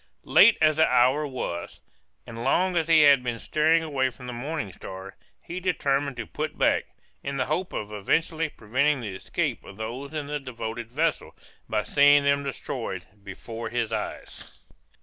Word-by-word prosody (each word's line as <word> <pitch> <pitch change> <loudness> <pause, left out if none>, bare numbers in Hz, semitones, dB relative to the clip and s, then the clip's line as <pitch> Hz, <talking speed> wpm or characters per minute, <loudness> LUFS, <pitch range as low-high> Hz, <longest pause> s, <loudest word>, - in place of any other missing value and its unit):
Late - - +7
as 155 -1 +4
the 160 - +5
hour 130 +4 +3
was, 105 -10 -5 0.5
and 115 0 -7
long 180 +7 +2
as 165 -2 +1
he 165 -2 +6
had 140 -3 +7
been 120 -2 -2
steering 160 +6 +2
away 135 -4 0
from 125 +1 -13
the 125 - -5
Morning 125 -3 -4
Star, 95 +2 -9 0.2
he 175 +2 -6
determined 140 -7 0
to - - -4
put - - -5
back, - - +2 0.4
in 140 0 -4
the 130 - 0
hope 175 +5 -2
of 105 0 -5
effectually 160 - 0
preventing 135 +5 0
the 105 -5 -5
escape 95 - -3
of 100 - -12
those 120 +6 -6
in 155 -2 -4
the 150 +1 -3
devoted 115 -3 -6
vessel, 155 +4 -1 0.3
by 105 - 0
seeing 145 +6 +5
them 140 0 +2
destroyed 125 -8 -4 0.2
before 115 +3 -7
his 115 -1 -2
eyes. 110 - -6
135 Hz, 170 wpm, -26 LUFS, 115-150 Hz, 0.5 s, Late